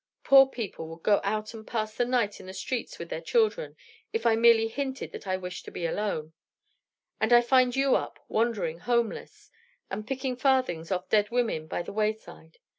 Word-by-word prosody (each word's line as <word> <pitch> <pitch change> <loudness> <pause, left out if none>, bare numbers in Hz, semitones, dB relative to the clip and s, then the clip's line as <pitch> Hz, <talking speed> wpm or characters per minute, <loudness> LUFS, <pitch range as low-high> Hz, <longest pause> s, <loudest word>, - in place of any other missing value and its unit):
Poor 270 -1 +8
people 210 -10 -6
would 165 +1 -11
go 205 -1 +4
out 215 +2 -2
and 220 -1 -10
pass 215 -2 -2
the 245 - +1
night 240 -5 0
in - - -12
the 190 - -8
streets 250 +3 -4
with - - -8
their - - -4
children, 480 0 0 0.3
if 450 - -3
I 230 -1 +5
merely 225 -1 +5
hinted 265 +2 -4
that - - -9
I 185 0 0
wished 180 -1 -7
to - - -9
be 170 - -4
alone. 160 -4 -2 0.9
And 220 - +1
I 240 0 +8
find 250 0 +3
you 270 0 +3
up, - - -2
wandering 215 -8 -1
homeless, 235 +2 -2 0.4
and 210 +3 -5
picking 265 -1 -2
farthings 255 - +1
off 185 0 -2
dead 210 -1 +3
women 230 -10 -1
by 175 - -3
the - - -8
wayside! 215 -6 -3
225 Hz, 190 wpm, -28 LUFS, 195-255 Hz, 0.9 s, Poor